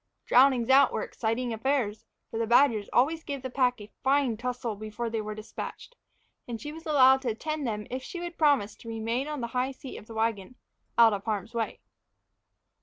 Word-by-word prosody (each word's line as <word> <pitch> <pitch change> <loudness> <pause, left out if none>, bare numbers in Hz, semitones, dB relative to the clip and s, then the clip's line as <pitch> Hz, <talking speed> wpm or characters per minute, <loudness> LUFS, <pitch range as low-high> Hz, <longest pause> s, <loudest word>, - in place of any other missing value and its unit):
Drownings 255 -1 +5
out 275 -1 +6
were - - -2
exciting 230 +1 -2
affairs, 225 -2 -1 0.3
for 225 - -3
the 230 - 0
badgers 235 -4 +4
always 315 +6 +2
gave 280 -2 -5
the 260 - -4
pack 250 -2 +2
a 205 0 -11
fine 270 -3 +2
tussle 245 -1 -3
before 215 +3 -5
they 225 -1 -1
were 215 0 -5
despatched; 215 - -8 0.5
and 235 -2 -5
she 295 +4 -6
was 320 +1 -10
allowed 265 -3 +6
to 255 - -1
attend 300 +5 -3
them 210 -2 -3
if 255 +1 -3
she 345 +7 -7
would 345 0 -6
promise 285 -9 +2
to 230 - -10
remain 230 +4 -2
on 300 -3 -4
the 235 - -3
high 255 +1 +1
seat 265 0 -9
of 215 - -12
the 225 - -10
wagon, 220 -1 -1 0.4
out 230 -2 +7
of 200 -1 -4
harm's 215 +1 -3
way. 230 -1 -3
245 Hz, 200 wpm, -28 LUFS, 220-270 Hz, 0.5 s, out